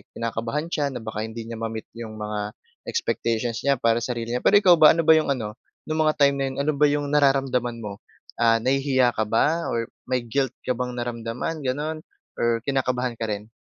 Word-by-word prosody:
kinakabahan 115 +7 -3
siya 145 -4 0
na 120 - -5
baka 110 0 -4
hindi 115 +1 -7
niya 115 - -5
ma-meet 110 -1 -5
'yong 110 -2 -7
mga 105 -1 -4 0.3
expectations 115 - -1
niya 140 - +5
para 115 -1 +2
sarili 120 -1 -3
niya. - - -10
Pero - - +3
ikaw 190 -4 +7
ba, 155 0 +8
ano 165 - +1
ba 160 - +7
'yong 145 -3 +1
ano, 110 -2 -6 0.3
no'ng 155 - 0
mga 155 - +3
time 140 - +4
na 135 - 0
'yon, 135 - -7
ano 150 - +1
ba 150 - +6
'yong 145 0 0
nararamdaman 135 -4 +2
mo? 100 -2 -6 0.4
Ah, 115 -1 +5
nahihiya 130 0 +2
ka 110 -1 -2
ba, 160 +9 +1
or 115 0 -1 0.2
may 125 -2 0
guilt 130 +2 -1
ka 125 - +1
bang 125 0 -4
naramdaman, 120 +6 -4
gano'n, 150 +4 -2 0.4
or 115 -1 +1
kinakabahan 125 -3 0
ka 115 - -2
rin? 105 +1 -5
125 Hz, 200 wpm, -24 LUFS, 115-140 Hz, 0.4 s, ba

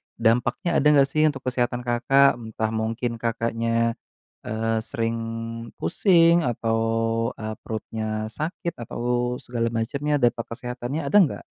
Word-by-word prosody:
Dampaknya 125 - +1
ada 150 - +3
enggak 140 -2 +5
sih 155 +2 +2
untuk 135 -3 -3
kesehatan, 125 -1 0
Kakak? 130 +2 +4
Entah 110 -1 -3
mungkin 115 +2 -2
Kakaknya, 115 0 0 0.5
eee, 110 +1 -1
sering 115 0 -2 0.6
pusing 170 -3 +4
atau, 115 -2 0 0.6
eee, 110 0 -4
perutnya 110 0 -4
sakit 170 - -4
atau 120 +1 -1
segala 115 -1 -2
macamnya. 140 +6 -1
Dampak 120 -1 +2
kesehatannya 125 +4 -4
ada 205 - +5
enggak? 175 -8 +2
120 Hz, 125 wpm, -24 LUFS, 115-135 Hz, 0.6 s, enggak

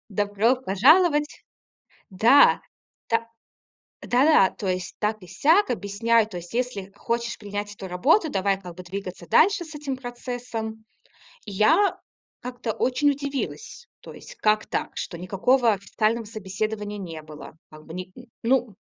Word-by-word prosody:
Добро 205 +4 +1
пожаловать! 295 - +3 0.7
Да! 225 +9 +5 0.5
Та 230 0 0 0.7
Да-да, 255 -5 +4
то 195 - -6
есть 180 -2 -3
так 215 -2 -1
и - - -12
сяк, 325 - +3
объясняю, 220 +1 +1
то 185 -5 -7
есть 175 +4 -10
если 235 -6 -3
хочешь 235 +2 -3
принять 205 0 -5
эту 195 -2 -8
работу, 295 - +2
давай 195 -2 0
как 180 -2 -10
бы 180 - -9
двигаться 185 -1 -7
дальше 380 0 +4
с 310 - -11
этим 285 -3 -4
процессом. 240 -3 -6 0.6
И 205 - -7
я 320 - +3 0.4
как-то 245 -3 -4
очень 285 +3 +2
удивилась, 280 - -5
то - - -11
есть - - -12
как 215 0 +2
так, - - -2
что 170 - -5
никакого 225 +7 +2
официального 215 +3 -1
собеседования 210 0 -4
не 165 -5 -7
было 155 -1 -11 0.2
как 155 0 -14
бы 160 - -10
ни 185 +1 -7 0.3
ну 245 -3 +1
220 Hz, 145 wpm, -24 LUFS, 195-255 Hz, 0.7 s, Да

